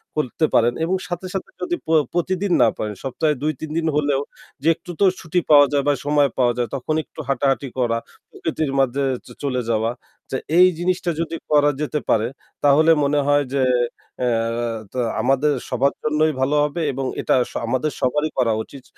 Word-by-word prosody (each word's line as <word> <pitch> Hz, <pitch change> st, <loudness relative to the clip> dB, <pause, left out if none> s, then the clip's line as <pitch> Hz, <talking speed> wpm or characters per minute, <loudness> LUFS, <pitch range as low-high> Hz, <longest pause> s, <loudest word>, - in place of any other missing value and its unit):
করতে 150 Hz, +1 st, 0 dB
পারেন 120 Hz, +1 st, +4 dB
এবং 175 Hz, +3 st, +1 dB
সাথে, 175 Hz, +1 st, -5 dB
সাথে 195 Hz, -, -4 dB
যদি 350 Hz, -1 st, -1 dB
প -, -, -11 dB, 0.2 s
প্রতিদিন 185 Hz, +3 st, -1 dB
না -, -, +6 dB
পারেন 105 Hz, -1 st, -3 dB
সপ্তাহে 145 Hz, +3 st, 0 dB
২-৩ 155 Hz, 0 st, -3 dB
দিন 165 Hz, -1 st, 0 dB
হলেও 145 Hz, -2 st, +1 dB, 0.4 s
যে 150 Hz, -, -2 dB
একটু 180 Hz, -, -10 dB
তো -, -, +3 dB, 0.2 s
ছুটি 165 Hz, +2 st, 0 dB
পাওয়া 145 Hz, -2 st, +8 dB
যায় 140 Hz, -1 st, +1 dB
বা 145 Hz, -, +4 dB
সময় 145 Hz, -1 st, +3 dB
পাওয়া 120 Hz, -2 st, +3 dB
যায় 120 Hz, -1 st, 0 dB
তখন 140 Hz, +4 st, -2 dB
একটু -, -, -16 dB
হাঁটাহাঁটি 135 Hz, 0 st, +1 dB
করা, 115 Hz, -2 st, +1 dB, 0.3 s
প্রকৃতির 155 Hz, -3 st, -3 dB
মাঝে 135 Hz, +1 st, +1 dB, 0.2 s
চ -, -, -17 dB, 0.2 s
চলে 130 Hz, -3 st, 0 dB
যাওয়া। 115 Hz, 0 st, +1 dB, 0.4 s
যে 130 Hz, -, 0 dB, 0.2 s
এই 180 Hz, +1 st, +8 dB
জিনিসটা 180 Hz, 0 st, 0 dB
যদি 165 Hz, 0 st, -3 dB, 0.2 s
করা 145 Hz, -1 st, +5 dB
যেতে 150 Hz, 0 st, -1 dB
পারে 110 Hz, +1 st, +3 dB, 0.4 s
তাহলে 150 Hz, +3 st, +5 dB
মনে 145 Hz, +1 st, +2 dB
হয় 145 Hz, 0 st, +4 dB
যে 140 Hz, -, +1 dB, 0.6 s
অ্যা 125 Hz, -, +1 dB, 0.6 s
টা 130 Hz, -, -3 dB, 0.2 s
আমাদের 135 Hz, +3 st, +2 dB, 0.2 s
সবার 140 Hz, +3 st, +1 dB
জন্যই 155 Hz, +1 st, +2 dB
ভালো 135 Hz, +3 st, +2 dB
হবে 150 Hz, +3 st, -2 dB
এবং 135 Hz, 0 st, -3 dB, 0.2 s
এটা -, -, +2 dB, 0.2 s
স -, -, -15 dB
আমাদের 130 Hz, +5 st, 0 dB
সবারই 150 Hz, +4 st, +1 dB
করা 120 Hz, -4 st, +2 dB
উচিত 135 Hz, +2 st, -13 dB
145 Hz, 185 wpm, -21 LUFS, 130-155 Hz, 0.6 s, পাওয়া